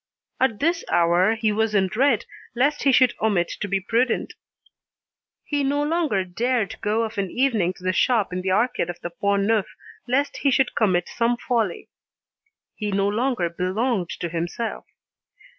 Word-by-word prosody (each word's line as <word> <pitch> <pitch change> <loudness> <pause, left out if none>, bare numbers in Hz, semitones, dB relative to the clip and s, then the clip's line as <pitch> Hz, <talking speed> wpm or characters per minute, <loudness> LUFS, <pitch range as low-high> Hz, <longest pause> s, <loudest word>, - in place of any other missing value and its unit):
At 255 -5 +1
this 335 +3 +1
hour, 175 +5 +3
he 220 -1 0
was 215 0 0
in 195 -1 +4
dread 235 +5 +1 0.3
lest 280 +5 +1
he 275 - +4
should 255 -1 +5
omit 200 -6 +1
to 205 - -1
be 195 0 0
prudent. 230 +5 0 1.1
He 290 -1 -1
no 285 +2 +1
longer 300 - 0
dared 225 +3 -1
go 220 +1 +1
of 220 -2 -4
an 195 -2 -1
evening 225 -9 +1
to 180 - -17
the 185 0 0
shop 220 -2 +2
in 180 - -2
the 190 - -2
Arcade 205 -2 +1
of 175 -1 -6
the 175 - -5
Pont 200 +2 0
Neuf 215 -1 +1 0.4
lest 275 +4 0
he 280 - +1
should 265 -1 +2
commit 185 -5 +1
some 235 +1 0
folly. 225 -8 -1 0.9
He 210 -2 -4
no 195 0 +1
longer 230 -2 0
belonged 185 +3 -1
to 170 - -2
himself. 175 +8 -4
220 Hz, 170 wpm, -23 LUFS, 185-250 Hz, 1.1 s, should